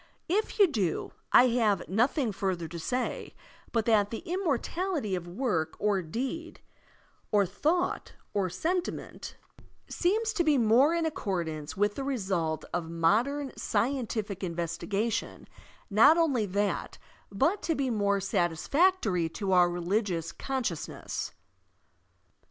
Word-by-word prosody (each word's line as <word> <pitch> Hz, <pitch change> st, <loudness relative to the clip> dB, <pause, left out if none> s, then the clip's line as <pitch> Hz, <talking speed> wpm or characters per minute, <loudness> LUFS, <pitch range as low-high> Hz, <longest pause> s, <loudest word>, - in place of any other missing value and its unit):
If 410 Hz, +6 st, 0 dB
you 410 Hz, -, +8 dB
do, 210 Hz, -, -1 dB, 0.2 s
I 255 Hz, -, +7 dB
have 225 Hz, -4 st, +1 dB
nothing 240 Hz, -, +1 dB
further 185 Hz, -4 st, -2 dB
to 170 Hz, +2 st, -7 dB
say, 250 Hz, +10 st, -3 dB, 0.4 s
but 230 Hz, -2 st, +1 dB
that 210 Hz, -3 st, +3 dB
the 225 Hz, -, -6 dB
immortality 340 Hz, -, -1 dB
of 175 Hz, -2 st, -3 dB
work 175 Hz, -5 st, -1 dB
or 205 Hz, -2 st, +1 dB
deed 265 Hz, -, -5 dB, 0.7 s
or 205 Hz, -1 st, +4 dB
thought 345 Hz, -, -1 dB, 0.2 s
or 195 Hz, -2 st, 0 dB
sentiment 355 Hz, -, -3 dB, 0.5 s
seems 435 Hz, +5 st, 0 dB
to 365 Hz, -5 st, +1 dB
be 305 Hz, -3 st, +3 dB
more 250 Hz, +7 st, +4 dB
in 335 Hz, -1 st, 0 dB
accordance 170 Hz, -, -3 dB
with 205 Hz, +1 st, +2 dB
the 275 Hz, -, -4 dB
result 190 Hz, -, -1 dB
of 170 Hz, -2 st, -2 dB
modem 230 Hz, -, +1 dB
scientific 220 Hz, -4 st, -1 dB
investigaticwi 185 Hz, +6 st, -2 dB, 0.3 s
— -, -, -29 dB
not 315 Hz, +7 st, +8 dB
only 275 Hz, -11 st, +2 dB
that, 200 Hz, 0 st, -1 dB, 0.3 s
but 275 Hz, -, +1 dB
to 325 Hz, -, 0 dB
be 270 Hz, -3 st, 0 dB
more 200 Hz, -2 st, +1 dB
satisfactory 195 Hz, -, +1 dB
to 195 Hz, +4 st, -4 dB
otir 180 Hz, -2 st, +5 dB
religious 175 Hz, -1 st, -1 dB
consciousness. 255 Hz, -, -4 dB
215 Hz, 125 wpm, -29 LUFS, 185-280 Hz, 0.7 s, you